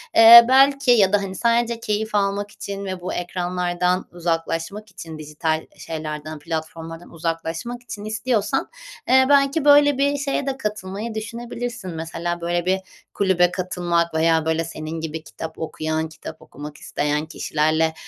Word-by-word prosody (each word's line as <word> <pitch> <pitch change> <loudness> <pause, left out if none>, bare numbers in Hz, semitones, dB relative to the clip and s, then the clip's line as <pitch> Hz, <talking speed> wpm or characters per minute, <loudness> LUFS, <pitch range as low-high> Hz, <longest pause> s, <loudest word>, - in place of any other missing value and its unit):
eee, 230 +1 +11
belki 270 0 +5
ya 205 -5 +5
da, 205 - +6
hani, 195 -1 -5
sadece 235 +1 +1
keyif 215 -1 -2
almak 200 0 0
için 200 -1 -6
ve 185 -1 -5
bu 180 - -4
ekranlardan 180 0 -1
uzaklaşmak 170 +4 -3
için 160 -2 -9
dijital, 155 +1 -2
eee, - - -19
şeylerden, 155 -1 -6
platformlardan 165 +1 -6
uzaklaşmak 165 +8 -4
için 210 -2 -8
istiyorsan, 215 0 -1 0.4
eee, 260 0 +6
belki 280 +2 +3
böyle 290 -1 +6
bir 285 +1 +2
şeye 280 -1 -1
de 270 -1 -2
katılmayı 210 0 -4
düşünebilirsin. 235 -1 -5
Mesela 165 +1 -4
böyle 175 0 -1
bir 190 +1 +2 0.3
kulübe 180 -3 +3
katılmak 175 -2 -1
veya 160 0 +2
böyle 160 0 +1
senin 160 0 -6
gibi 160 0 -5
kitap 160 0 -8
okuyan, 160 0 -2
kitap 160 0 -10
okumak 150 +1 -10
isteyen 150 +1 -2
kişilerle, 155 +1 0
180 Hz, 145 wpm, -22 LUFS, 160-225 Hz, 0.4 s, eee